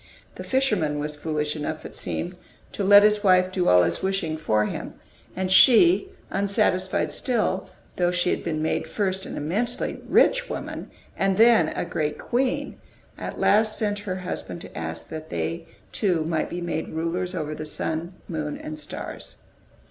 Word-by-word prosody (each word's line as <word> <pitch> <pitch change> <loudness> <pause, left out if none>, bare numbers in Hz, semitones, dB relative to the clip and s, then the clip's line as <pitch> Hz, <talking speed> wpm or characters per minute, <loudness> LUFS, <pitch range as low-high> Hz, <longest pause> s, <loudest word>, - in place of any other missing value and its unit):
The - - -8
fisherman 210 - +1
was 150 +1 -3
foolish 150 0 -2
enough, 155 +1 -4
it - - -9
seemed, 175 +2 -4 0.4
to 205 - -3
let 205 +1 +8
his 210 0 +3
wife 185 -1 +4
do 185 -1 0
all 90 0 +6
his 85 0 -1
wishing 190 -5 -1
for 110 -9 +1
him; - - -5 0.4
and 185 0 -2
she, 345 - +7 0.2
unsatisfied 195 -2 +1
still, 220 -6 -1 0.3
though 175 -1 +2
she 180 0 +1
had - - -2
been 155 -2 -2
made 160 - -1
first 190 -2 -2
an - - -6
immensely 210 +12 -2
rich - - +4
woman, - - -5 0.3
and 195 -1 +1
then 225 -8 +6
a - - -3
great 150 -1 -2
queen, 270 +4 -1 0.4
at - - -6
last 215 +1 +3
sent 205 -2 -1
her 200 -3 -4
husband 180 -2 -5
to - - -11
ask 80 0 -5
that 155 0 -7
they 165 0 -3 0.2
two 175 -7 +1
might 160 -1 -1
be 175 - -5
made 170 -2 -3
rulers 175 +3 -2
over 155 -3 -3
the 155 0 -6
sun, 160 +3 -3
moon, 155 -3 -3
and 155 0 -7
stars. 150 - -5
180 Hz, 170 wpm, -25 LUFS, 155-205 Hz, 0.4 s, let